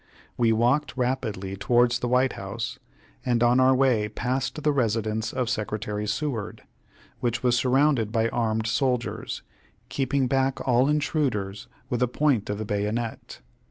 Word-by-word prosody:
We 115 -2 +3
walked 125 +7 +1
rapidly 115 -7 -2
towards 120 +4 +2
the 125 - -2
White 125 +1 +2
House, 115 +5 -5 0.4
and 120 -2 +1
on 120 +2 +4
our 130 0 +5
way 125 -6 +2
passed 125 +5 -2
the 150 - +3
residence 110 -4 0
of 125 -2 -1
Secretary 105 -2 -3
Seward, 110 -3 -3 0.6
which 120 0 -1
was 125 -1 +3
surrounded 130 -3 +2
by 115 0 +2
armed 110 -2 -1
soldiers, 125 +1 -1 0.5
keeping 135 0 0
back 135 +1 +1
all 125 +2 +4
intruders 135 -10 -1 0.2
with 120 - 0
the 125 - +3
point 130 -4 +1
of 105 - -2
the 110 - -4
bayonet. 105 - -3
120 Hz, 145 wpm, -26 LUFS, 110-130 Hz, 0.6 s, our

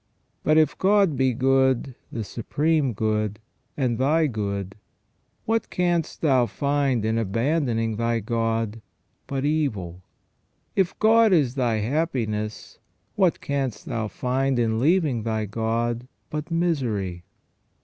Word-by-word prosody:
But 155 +1 +3
if 155 -1 +4
God 195 -5 +3
be 130 0 +2
good, 130 0 +2 0.2
the 115 - -3
supreme 145 +6 0
good, 105 0 -1 0.4
and 125 -5 0
thy 155 +5 +3
good, 100 -6 -3 0.7
what 225 +1 0
canst 175 -3 -1
thou 130 -6 +3
find 140 -5 0
in 110 +1 +1
abandoning 115 - 0
thy 115 0 0
God 115 0 -1 0.5
but 135 0 -2
evil? 105 - -1 0.7
If 190 -2 +1
God 225 0 +5
is 145 -9 +3
thy 120 -5 0
happiness, 110 -6 -2 0.3
what 185 -4 +2
canst 135 -7 -2
thou 110 -1 -2
find 130 +3 -1
in 115 -2 +1
leaving 150 -4 +2
thy 110 -1 -1
God 115 +3 -2 0.2
but 150 +2 -4
misery 120 - -1
125 Hz, 120 wpm, -24 LUFS, 110-150 Hz, 0.7 s, God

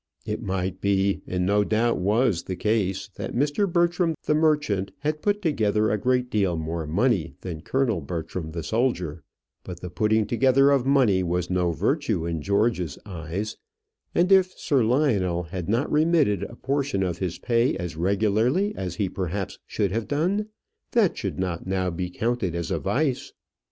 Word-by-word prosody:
It - - -3
might 95 0 -3
be, 100 0 +1
and 90 0 -1
no 105 +2 +3
doubt 115 +3 +1
was 105 0 +1
the 95 - -3
case, 100 -2 0
that - - -5
Mr. 145 +9 +1
Bertram 170 -1 +2
the - - +1
merchant 150 -11 +1
had 150 +1 -1
put 205 0 0
together 110 - +1
a 105 - +1
great 125 +2 +1
deal 95 -5 +1
more 80 0 -3
money 95 -1 +1
than 85 -4 -6
Colonel 115 -3 0
Bertram 80 +2 -5
the 85 0 -5
soldier; 90 - -1 0.4
but 90 -1 -8
the 90 - -6
putting 110 +2 +2
together 135 +5 +4
of 135 -2 +2
money 125 -9 +4
was 90 0 -1
no 90 -1 +2
virtue 110 - 0
in 85 -2 -2
George's 100 - 0
eyes; 90 +2 -5 0.6
and 180 +3 +3
if 185 -1 +5
Sir 135 -5 +2
Lionel 110 - +1
had 90 +1 -6
not 120 +7 +1
remitted 150 - +3
a 110 +4 -6
portion 135 -5 -1
of 90 -2 -2
his 90 -2 -2
pay 120 -1 +1
as 90 -3 -5
regularly 110 - +1
as 90 -2 -4
he 100 +1 0
perhaps 95 +1 -4
should 100 -3 -1
have 110 +2 -2
done, 185 +9 0 0.5
that 220 -7 +3
should 100 - -4
not 90 -2 -3
now 95 -1 0
be 90 +1 -3
counted 110 -2 -1
as 85 -1 -3
a - - 0
vice. 135 -2 -1
105 Hz, 170 wpm, -25 LUFS, 90-135 Hz, 0.6 s, if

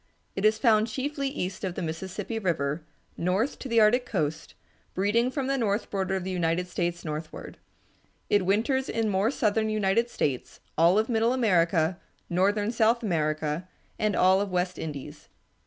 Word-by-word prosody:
It 195 - -1
is 215 0 +4
found 220 -2 +3
chiefly 275 +4 -3
east 190 -9 -4
of 185 -2 -3
the - - -4
Mississippi 185 +7 -4
River, 160 -6 -1 0.4
north 190 +10 0
to 265 - -6
the 230 -1 +4
Arctic 220 +4 +5
coast, 155 -9 -3 0.4
breeding 210 +6 +2
from 270 0 -3
the 275 0 0
north 210 -2 -1
border 190 -1 -1
of 190 - -2
the 190 - -4
United 175 0 0
States 175 -1 -3
northward. 155 +1 -6 0.7
It 205 -2 +3
winters 230 +8 +1
in 225 -1 0
more 200 +2 +2
southern 220 -4 +1
United 215 +2 +1
States, 135 - -3 0.2
all 170 +4 +4
of 220 +1 +2
middle 230 0 +2
America, 175 -7 +2 0.3
northern 205 +4 +2
South 230 +1 +2
America, 155 -2 -1 0.3
and 210 -2 +1
all 190 +1 +4
of 205 - -2
West 180 0 -1
Indies. 145 -4 -7
195 Hz, 165 wpm, -27 LUFS, 175-225 Hz, 0.7 s, Arctic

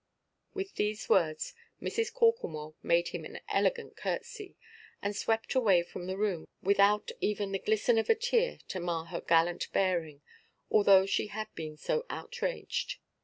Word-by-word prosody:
With 390 0 -4
these 210 +1 -1
words, 155 -4 +2 0.3
Mrs. 455 0 -1
Corklemore 170 - +1
made 170 0 +2
him - - -5
an - - -8
elegant 485 -2 0
curtsey, 460 -5 -5 0.4
and 205 +1 -2
swept 225 +2 0
away 205 -10 +4
from 175 +1 -8
the 190 +1 -3
room, 195 -6 -1 0.2
without 200 +2 +4
even 205 -1 0
the 195 - -1
glisten 220 +3 +2
of 225 - -2
a 455 - +6
tear 485 +1 +1
to 185 - -3
mar 170 -2 -2
her 170 0 -5
gallant 170 +1 +2
bearing, 165 -6 0 0.5
although 200 -2 +6
she 195 - 0
had 215 +1 -6
been 155 -2 -6
so - - -1
outraged. 485 +1 -3
200 Hz, 155 wpm, -31 LUFS, -, 0.5 s, a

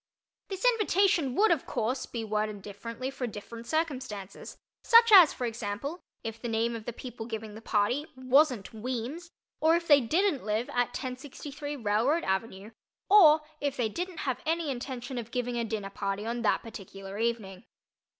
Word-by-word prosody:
This 385 +2 -4
invitation 390 - +3
would 430 -2 +4
of 325 -5 +1
course 245 +2 -2
be 230 -2 -4
worded 215 -2 -2
differently 230 +6 -6
for 260 -2 -4
different 230 +2 -9
circumstances, 255 - -3 0.3
such 465 -1 +7
as, 365 -7 +10
for 250 - -4
example, 230 - -4 0.2
if 225 0 -6
the 240 - -3
name 230 +1 0
of 220 -1 -7
the - - -3
people 235 -1 -8
giving 220 -2 -6
the 220 - -10
party 230 +8 0
wasn't 260 -4 +2
Weems 255 +9 -4 0.3
or 320 +1 +4
if 340 0 -2
they 290 -2 +7
didn't 320 - +1
live 215 +3 -1
at 245 -1 +1
1063 285 +3 -6
Railroad 235 +7 +1
Ave., 190 +2 -2 0.4
or 315 -7 +8 0.2
if 285 -1 -2
they 235 -3 +1
didn't 355 - -5
have 260 -3 -2
any 325 -2 0
intention 255 0 -5
of 230 -1 -7
giving 245 0 -2
a 235 - 0
dinner 210 -3 -4
party 200 +1 -3
on 235 +1 -2
that 220 - +1
particular 195 -2 -9
evening. 225 -3 -2
240 Hz, 170 wpm, -29 LUFS, 220-295 Hz, 0.4 s, as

